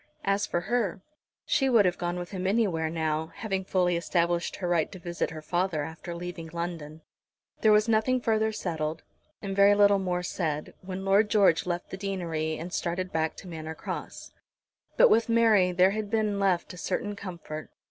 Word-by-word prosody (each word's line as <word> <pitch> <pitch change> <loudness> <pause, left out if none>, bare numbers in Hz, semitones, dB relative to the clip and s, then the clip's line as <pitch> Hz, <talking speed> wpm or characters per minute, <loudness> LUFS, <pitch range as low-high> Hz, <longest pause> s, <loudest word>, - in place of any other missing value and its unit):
As 200 +1 +1
for 175 - -1
her, 210 -2 -1 0.4
she 270 -1 +2
would 230 -5 +5
have 180 -1 0
gone 175 0 -2
with 175 0 -6
him 185 -1 -3
anywhere 190 -7 +1
now, 160 -1 -2
having 195 -4 -2
fully 180 -2 +1
established 170 0 0
her 180 - -4
right 170 -3 +1
to 190 - -8
visit 175 -1 -3
her 155 -1 -8
father 175 -2 0
after 160 +3 -7
leaving 175 -1 -6
London. 165 -2 -5 0.6
There 215 - +5
was 210 +1 +4
nothing 230 +3 +2
further 220 -2 +1
settled, 160 -6 -3 0.4
and 195 -1 -3
very 200 +1 +6
little 205 -1 +5
more 180 -2 -1
said, 155 -4 -3
when 190 +1 -6
Lord 200 +2 +4
George 195 -6 +4
left 175 0 -3
the 190 - -5
deanery 170 -5 -2
and 175 +3 -7
started 180 +2 -2
back 160 0 -1
to - - -11
Manor 160 -2 -6
Cross. - - -7 0.7
But - - +7
with 230 +1 +3
Mary 220 -5 +4
there 180 +2 +4
had 215 0 -3
been 215 -2 0
left 185 -4 +1
a - - -10
certain 205 +4 -2
comfort. 170 -6 -7
180 Hz, 185 wpm, -28 LUFS, 170-205 Hz, 0.7 s, But